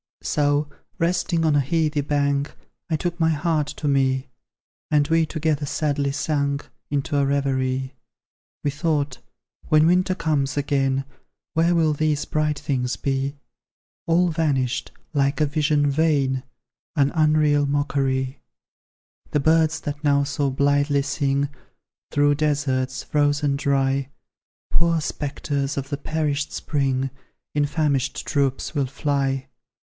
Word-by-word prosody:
So, 145 0 +1 0.3
resting 170 -1 +1
on 155 -2 +3
a - - +5
heathy 150 +1 +1
bank, 140 0 0 0.3
I 160 - +1
took 175 +2 -3
my 160 -1 +3
heart 155 -1 +1
to 150 - -3
me; 135 -1 +1 0.6
And 145 -1 +3
we 165 -1 +3
together 155 -2 -1
sadly 145 -1 0
sank 140 -1 -1 0.2
Into 145 0 -1
a 140 - +3
reverie. 130 -2 0 0.7
We 145 - +1
thought, 145 -3 -1 0.5
"When 155 0 +5
winter 185 +2 +3
comes 145 -6 0
again, 135 -1 +1 0.5
Where 170 +2 +3
will 160 -2 +3
these 150 0 0
bright 150 -1 0
things 125 -3 -1
be? 135 +1 -1 0.7
All 175 +2 +3
vanished, 135 -6 0 0.2
like 140 0 +1
a 155 - +4
vision 145 -1 +2
vain, 140 -4 +2 0.5
An 140 -2 +3
unreal 155 -2 +3
mockery! 135 -2 0 0.9
"The 150 - +1
birds 160 +1 +3
that 145 +1 -5
now 140 -1 +3
so 140 0 -1
blithely 140 +1 +2
sing, 140 0 0 0.6
Through 145 0 +3
deserts, 135 -4 0
frozen 145 -1 +1
dry, 135 -1 +1 0.6
Poor 170 -1 +2
spectres 145 -2 -3
of 140 0 -3
the 140 - -2
perished 150 -1 -1
spring, 135 -3 -1 0.4
In 145 -1 +2
famished 140 -3 0
troops 140 0 0
will 140 -4 0
fly. 135 -1 -1
145 Hz, 125 wpm, -23 LUFS, 140-155 Hz, 0.9 s, a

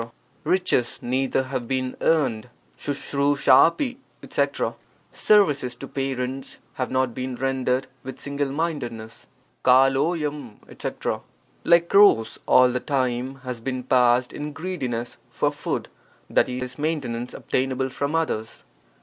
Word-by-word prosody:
— 130 - -37
Riches 180 -10 +1
neither 130 +1 0
have 130 -2 -4
been 130 0 -2
earned. 125 -8 +1 0.3
^9^1 145 0 0 0.3
ft 245 - -2 0.3
etc. - - -1 0.2
— - - -37 0.2
Services 145 - +4
to 135 - -8
parents 135 0 -3 0.2
have 130 -3 -3
not 130 -2 0
been 130 0 -4
rendered 130 0 0 0.2
with 130 - -8
single 140 -1 -2
mindedness. 125 -8 -4 0.4
<*idl5^f 135 0 +2
etc. - - -4 0.2
— - - -37
Like 170 0 +4
crows, 195 - +5
all 125 0 +6
the 125 - -1
time 130 -1 -1
has 125 -2 -5
been 130 +2 -4
passed 125 -1 +3
in 150 0 -5
greediness 135 -9 -4
for - - 0
food, - - -3 0.5
i.e., 125 0 +1
maintenance 135 -6 -2
obtainable 130 0 -1
from 140 +4 -2
others. 135 -9 -2
130 Hz, 125 wpm, -24 LUFS, 125-145 Hz, 0.5 s, all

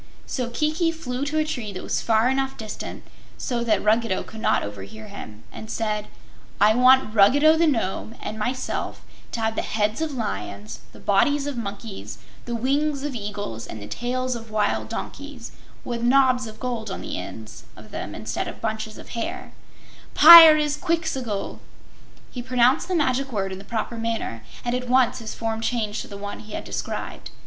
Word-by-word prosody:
So 250 -3 -3
Kiki 310 +6 +1
flew 280 -5 -4
to 300 +2 -2
a 310 - +2
tree 240 -8 -4
that 185 - -6
was - - -1
far 225 +1 +3
enough 270 +1 0
distant 220 -2 -7 0.3
so 240 -3 -2
that 215 -4 +1
Ruggedo 220 -2 +2
could 220 - -10
not - - +2
overhear 100 +1 -8
him 110 +1 -10
and 220 - -9
said: 215 -2 -2 0.5
"I 210 +2 +6
want 255 -1 +5
Ruggedo, 285 +10 +6
the 330 +1 +3
Nome, 225 -4 -1
and 215 +1 -6
myself 250 +4 -3 0.3
to 230 - -3
have 220 0 +1
the - - 0
heads 215 +4 -1
of 315 -2 -2
lions, 105 - -5
the - - -14
bodies 280 +8 +2
of 290 -2 -3
monkeys, 205 -2 -6 0.3
the 240 - -3
wings 280 +4 0
of 290 -2 -3
eagles 205 - -5
and 110 - -7
the 100 - -8
tails 255 - -2
of 230 -1 -8
wild 215 -1 0
asses, - - -7 0.3
with 235 -1 -3
knobs 255 0 +4
of 220 0 -11
gold 235 -4 -3
on 190 - -5
the - - -4
ends 110 -1 -9
of - - -13
them 100 - -5
instead 110 +1 -3
of - - -7
bunches 220 -1 -3
of - - -12
hair 320 +11 -5 0.6
Pyrzqxgl!" 310 - +7 0.7
He 250 - -5
pronounced 250 +5 +3
the 365 - -1
magic 275 -3 +1
word 195 -4 -2
in 190 - -6
the - - -10
proper 230 +2 -3
manner 225 - -3 0.2
and 240 - 0
at 250 0 -3
once 255 -1 +3
his 220 -2 -6
form 225 -1 -3
changed 225 -3 -1
to - - -9
the 200 - -8
one 205 0 -6
he 215 - -11
had - - -4
described. - - -5
235 Hz, 180 wpm, -24 LUFS, 210-265 Hz, 0.7 s, Pyrzqxgl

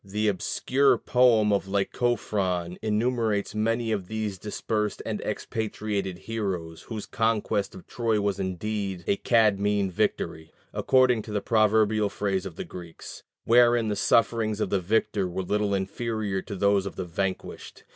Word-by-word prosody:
The 105 +2 0
obscure 130 +8 +2
poem 115 -4 +4
of 100 -1 0
Lycophron 95 -4 -1
enumerates 110 -2 0
many 115 +2 0
of 100 -4 -2
these 110 -3 -3
dispersed 105 +1 -2
and - - -3
expatriated 105 -4 -3
heroes, 95 -7 -4
whose 110 -3 -6
conquest 110 -3 0
of 95 - -11
Troy 115 -3 0
was 100 -1 -1
indeed 95 0 -3
a 100 - +1
"Cadmean" 105 -4 +2
victory 80 -2 -2 0.2
(according 130 -3 +3
to 105 - -9
the 105 - 0
proverbial 110 -1 +3
phrase 100 -2 -2
of 85 - -10
the - - -5
Greeks), 85 -2 -10 0.2
wherein 120 -1 +5
the 105 - 0
sufferings 110 -1 +2
of - - -1
the 100 - +2
victor 100 0 0
were 90 +2 -3
little 105 +1 0
inferior 100 0 -2
to 100 - -7
those 100 0 +2
of - - -7
the 95 - -4
vanquished. 95 +2 -4
105 Hz, 145 wpm, -26 LUFS, 95-110 Hz, 0.2 s, wherein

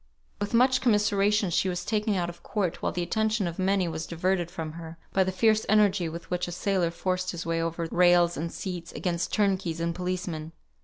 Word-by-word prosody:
With 205 +3 -2
much 255 +2 +4
commiseration 210 -3 +2
she 185 - +2
was 180 -1 -3
taken 215 -1 0
out 175 -2 0
of 175 0 -9
court, 190 -5 -2
while - - 0
the 175 - -2
attention 220 +2 0
of 170 +1 -6
many 190 -1 +2
was 160 -1 -4
diverted 175 +1 0
from 160 -3 -5
her, 165 0 -9 0.2
by 190 - +4
the 190 - -1
fierce 215 +3 +3
energy 200 -5 +3
with 165 +1 -8
which 180 0 -1
a - - -5
sailor 180 -1 0
forced 185 +2 -2
his 170 -1 -4
way 165 0 0
over 165 0 -2
rails 175 -1 +4
and 165 +3 -3
seats, 175 -3 -6
against 175 -2 -2
turnkeys 190 -5 0
and 170 0 -1
policemen. 180 -3 -4
180 Hz, 205 wpm, -27 LUFS, 170-200 Hz, 0.2 s, much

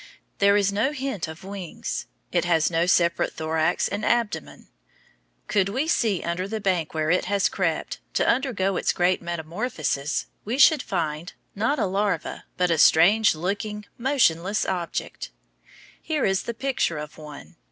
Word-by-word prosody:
There 200 0 +5
is 200 -1 +1
no 225 +8 +1
hint 265 - -3
of 160 +3 -10
wings. 195 -3 -5 0.2
It 175 -2 +1
has 165 -2 +2
no 165 +1 +1
separate 170 -2 +2
thorax 160 +2 0
and 205 +2 -4
abdomen. 210 - -1 0.8
Could 195 -1 +2
we 265 +9 -1
see 220 - +1
under 175 +2 -2
the 220 +2 -3
bank 180 -6 -1
where 155 0 +1
it 180 - +2
has 200 +1 +2
crept, - - -2 0.2
to - - +2
undergo 200 -8 +1
its - - +1
great 180 +1 +2
metamorphosis, 165 - -2 0.2
we 230 +5 -2
should 295 0 +6
find, 165 -3 -3 0.2
not 225 +9 0
a - - +1
larva, 200 +2 -2
but 180 -1 +2
a 165 - +2
strange 200 +7 +5
looking, 205 +5 -3
motionless 215 - +2
object. 175 -3 -4 0.7
Here 310 -3 -1
is 190 -1 +1
the 235 - -5
picture 255 - -1
of 150 +1 -8
one. 150 +2 -11
190 Hz, 155 wpm, -24 LUFS, 165-215 Hz, 0.8 s, should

